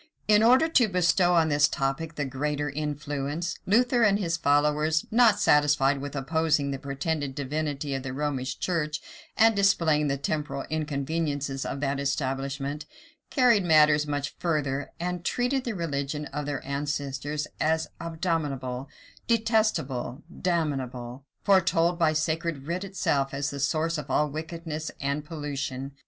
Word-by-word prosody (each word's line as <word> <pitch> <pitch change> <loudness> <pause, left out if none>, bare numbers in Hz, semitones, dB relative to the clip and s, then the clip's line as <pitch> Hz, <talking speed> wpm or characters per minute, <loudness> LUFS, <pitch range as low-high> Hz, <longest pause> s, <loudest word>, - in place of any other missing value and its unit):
In 210 0 +5
order 255 +7 +5
to 260 -8 +4
bestow 180 -1 +3
on 160 -2 +4
this 145 0 +4
topic 145 +4 -2
the 145 - -2
greater 145 +2 -2
influence, 145 +2 -3
Luther 240 +4 +3
and 205 -3 +5
his 170 -5 -1
followers, 150 +1 +2
not 225 -3 +5
satisfied 145 -5 +3
with 145 +1 -6
opposing 150 0 +1
the 135 - -4
pretended 140 0 -3
divinity 145 0 -3
of 135 - -2
the 130 -1 -5
Romish 135 -1 -2
church, 155 -4 -1 0.4
and 225 0 +5
displaying 165 -7 +3
the 140 0 0
temporal 145 0 -2
inconveniences 145 -2 -2
of 140 - -4
that 140 -1 0
establishment, 140 +1 -2 0.4
carried 245 -7 +4
matters 150 -3 +5
much 145 -1 -2
further, 145 -5 -1
and 175 0 -3
treated 250 +6 0
the 235 -3 -2
religion 150 -3 -3
of 145 0 -3
their 140 -2 -4
ancestors 145 +1 -3
as 160 +1 +1
abominable, 150 -6 -3 0.4
detestable, 215 - 0 0.2
damnable; 135 -7 -2 0.2
foretold 175 -3 +3
by 160 -2 +4
sacred 155 -2 -1
writ 175 +4 -2
itself 140 -8 -1
as 140 +1 -1
the 140 - -6
source 155 +3 0
of 145 -1 -8
all 150 +3 +2
wickedness 160 0 -5
and 140 +2 -2
pollution. 140 -4 -4
150 Hz, 140 wpm, -27 LUFS, 140-170 Hz, 0.4 s, In